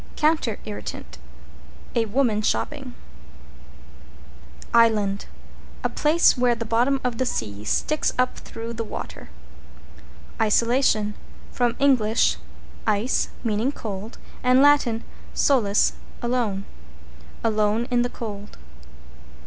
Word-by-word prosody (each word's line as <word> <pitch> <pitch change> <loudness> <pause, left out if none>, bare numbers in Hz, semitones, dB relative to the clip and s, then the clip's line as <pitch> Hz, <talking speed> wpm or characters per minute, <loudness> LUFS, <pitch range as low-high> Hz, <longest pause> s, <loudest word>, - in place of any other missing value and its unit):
=COUNTER 305 -8 +1
IRRITANT= 75 - -7 0.7
A 230 -1 +2
woman 220 -1 +1
shopping. 270 +3 -2 1.8
=ISLAND= 215 -4 +3 0.6
A - - +1
place 315 +3 +4
where 245 -2 +2
the 230 0 -5
bottom 245 +5 +2
of 245 -2 -2
the 260 - +2
sea 105 - -3
sticks 305 - +1
up 255 0 +1
through 230 +1 -7
the 230 0 -3
water. 220 - -8 1.1
=ISOLATION= 220 -1 +2 0.4
From 240 -1 0
Eng. 275 -4 +4 0.9
ice, 210 +5 +1
meaning 225 +3 0
cold, 215 -4 -7 0.2
and 255 +2 +5
Lat. 290 -2 +6 0.5
solus, 215 -8 +3 0.3
alone. 235 -5 -1 0.8
Alone 215 +1 +1
in 245 -1 +3
the 245 - 0
cold. 210 -4 -7
230 Hz, 100 wpm, -24 LUFS, 210-255 Hz, 1.8 s, Lat